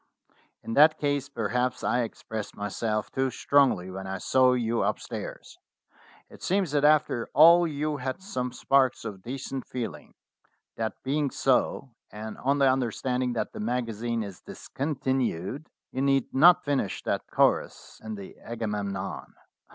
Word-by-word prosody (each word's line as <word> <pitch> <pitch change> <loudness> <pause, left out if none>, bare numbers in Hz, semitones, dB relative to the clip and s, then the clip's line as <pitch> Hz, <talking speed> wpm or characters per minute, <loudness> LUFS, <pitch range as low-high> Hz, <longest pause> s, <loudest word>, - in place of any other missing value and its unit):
"In 115 - -5
that 155 +4 +6
case 145 -2 -1
perhaps 125 0 -1
I 120 +2 +1
expressed 110 -2 -6
myself 105 +1 -2
too 135 -1 0
strongly 130 -10 +2
when 95 +1 -6
I 95 0 -3
saw 130 +6 +3
you 115 -2 0
upstairs. - - -4 0.7
It - - -14
seems 190 -4 0
that 145 -1 +1
after 150 -6 +3
all 170 +4 +8
you 150 0 -2
had 130 +4 -4
some 130 -11 -4
sparks 130 -1 +2
of 100 -4 -6
decent 135 +3 -5
feeling. 125 -3 -6 0.6
That 110 -2 -3
be 140 +3 0
ing 145 -2 +1
so, 130 0 +1 0.2
and 110 +1 -7
on 140 +2 +1
the 140 -1 +4
understanding 125 0 -1
that 115 - -3
the - - -7
magazine 115 0 -2
is 100 -3 -9
discontinued, 130 - -3 0.2
you 130 - -3
need 135 -2 +1
not 170 +6 +6
finish 140 -8 -1
that - - -2
chorus - - 0
in 110 -1 -5
the 100 -2 -10
'Agamemnon.' 105 -4 -4
125 Hz, 145 wpm, -27 LUFS, 110-140 Hz, 0.7 s, all